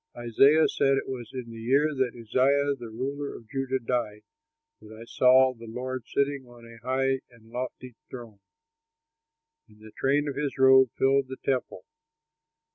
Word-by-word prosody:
Isaiah 135 +7 +4
said 135 0 +1
it - - -3
was 125 -4 -6
in 125 -3 -7
the 115 0 -9
year 140 +6 +2
that 130 -3 -2
Uzziah, 140 +5 +2
the 120 -4 -9
ruler 140 +5 -5
of 115 - -13
Judah, 135 +1 -2
died 115 -4 -3 0.6
that 110 0 -13
I 115 - -10
saw 130 +2 +4
the 115 -1 -13
Lord 125 +1 -5
sitting 140 -2 -1
on 120 -1 -15
a 115 0 -14
high 135 +1 0
and 115 -2 -21
lofty 125 0 -6 0.2
throne; 115 -5 -10 1.3
and 105 - -22
the 110 0 -14
train 140 +6 0
of 140 - -4
his 145 0 -3
robe 130 -1 +6
filled 135 0 +2
the 130 0 -8
temple. 130 - -2
130 Hz, 165 wpm, -27 LUFS, 115-135 Hz, 1.3 s, robe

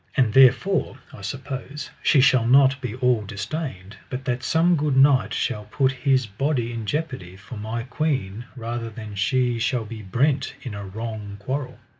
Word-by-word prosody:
And 120 -6 +3
therefore 135 +4 +4 0.2
I - - -11
suppose 135 +6 -6
she 140 - +4
shall 125 -3 +4
not 135 +2 +5
be 120 -4 -4
all 125 -3 +2
distained, 105 - -5
but 130 +1 -5
that 125 0 -1
some 165 +5 +3
good 145 -3 0
knight 135 -1 +5
shall 105 0 -2
put 130 +5 +1
his 130 -1 +1
body 120 +3 -1
in 115 -2 -5
jeopardy 130 - -3
for 100 +6 -11
my 110 +2 -4
queen 125 -6 -2
rather 115 -1 -4
than 110 -1 -9
she 120 +3 +1
shall 115 0 0
be 110 0 -8
brent 130 +7 0
in 125 - -6
a 100 0 -6
wrong 105 0 -6
quarrel. 130 +6 -4
125 Hz, 170 wpm, -24 LUFS, 110-135 Hz, 0.2 s, not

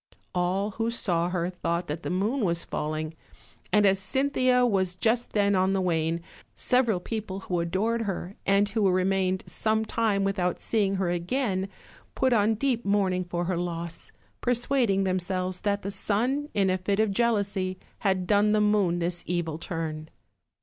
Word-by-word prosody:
All 185 +3 0
who 225 +3 -1
saw 175 -7 0
her 180 0 -1
thought 170 -1 -2
that 155 +1 -4
the - - -4
moon 215 +8 0
was 170 -3 0
falling; 155 +1 -3 0.6
and 210 -1 +5
as 195 -1 +4
Cynthia 255 +2 +2
was 190 -5 +1
just 230 +5 0
then 200 -1 +3
on 190 0 +2
the 195 - +1
wane, 165 -2 0 0.3
several 240 -6 +2
people 195 -1 -5
who 180 -2 -2
adored 200 +8 0
her, 195 -2 -4
and 200 +1 +3
who 205 -2 +2
remained 185 0 +1
some 220 0 0
time 215 -3 +1
without 190 -2 0
seeing 200 -3 +1
her 190 -2 0
again, 190 +2 -1 0.5
put 260 -1 +2
on 220 0 +3
deep 245 0 0
mourning 195 -2 +1
for 175 0 -2
her 180 0 -1
loss, 170 -1 -4 0.3
per 245 0 +2
suading 240 -6 +1
themselves 185 0 -1
that 205 -1 -1
the 200 - -3
sun, 250 +9 -1
in 195 -2 +3
a 185 - 0
fit 195 +2 0
of 220 -2 +3
jealousy, 200 -4 0 0.2
had 190 -3 +1
done 210 +2 +3
the 215 - +3
moon 210 -4 +3
this 175 0 -1
evil 165 -3 -2
turn. 160 -2 -4
195 Hz, 170 wpm, -27 LUFS, 180-215 Hz, 0.6 s, and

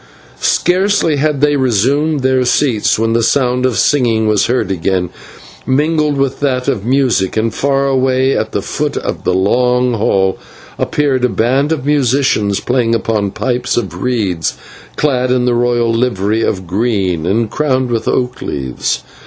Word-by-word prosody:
Scarcely 180 -3 +1
had 145 -1 0
they 145 0 +3
resumed 135 +4 +1
their 130 0 +2
seats 125 -3 +1
when 115 +1 0
the 115 - +2
sound 125 +1 +1
of 120 -5 -2
singing 115 -1 +2
was 105 -2 +2
heard 120 -6 0
again, 90 0 -1 0.6
mingled 150 +2 +1
with 135 -1 -1
that 130 -3 -1
of 100 - -1
music, 125 -6 +1
and 110 0 0
far 140 +1 0
away 130 0 +1
at - - -2
the - - -2
foot - - -3
of - - -4
the - - +1
long 125 +5 +2
hall 95 -3 0 0.4
appeared 140 -4 0
a 125 - +3
band 130 +7 0
of 150 -5 -2
musicians 130 -7 +1
playing 120 -2 0
upon 110 -2 -1
pipes 125 +4 -2
of 95 -6 -3
reeds, 95 - -1 0.4
clad 130 -4 0
in 125 -1 +1
the 125 - +2
royal 120 -1 +1
livery 115 -2 0
of 95 -4 -2
green, 95 -4 -1
and 110 +3 0
crowned 130 -4 0
with 115 -1 -2
oak 125 0 -1
leaves. 65 -3 -3
125 Hz, 160 wpm, -14 LUFS, 105-135 Hz, 0.6 s, they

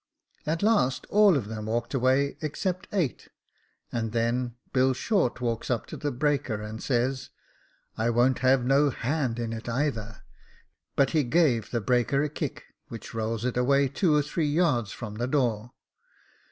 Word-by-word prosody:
At 165 +4 -1
last 205 - +2
all 205 -5 +6
of 115 -7 -3
them 110 -1 -6
walked 115 +3 -2
away 135 +2 +2
except 180 +4 -3
eight, 175 -11 -1 0.6
and 115 -2 -2
then 120 +1 0 0.2
Bill 130 0 +3
Short 190 - 0
walks 115 -2 -2
up 120 -3 0
to - - -8
the 145 - -2
breaker 140 -4 0
and 105 +1 -7
says, 130 0 -1 0.3
" - - -38
*I 115 +1 +2
won't 120 +2 +3
have 130 -1 +3
no 140 +3 +4
hand 130 -1 -1
in 115 -1 -3
it 115 +1 -6
either;' 115 -4 -2 0.7
but 135 -1 +3
he 155 -3 +2
gave 125 -5 +2
the 120 - -1
breaker 125 +5 +2
a 150 - -1
kick, 150 - -5 0.2
which 115 0 -9
rolls 115 +1 -2
it 125 -1 -1
away 140 +2 +3
two 155 +3 +2
or 150 - +3
three 150 +2 -1
yards 145 - +1
from 105 -4 -7
the 120 +2 -1
door. 120 -5 0
125 Hz, 170 wpm, -27 LUFS, 115-145 Hz, 0.7 s, all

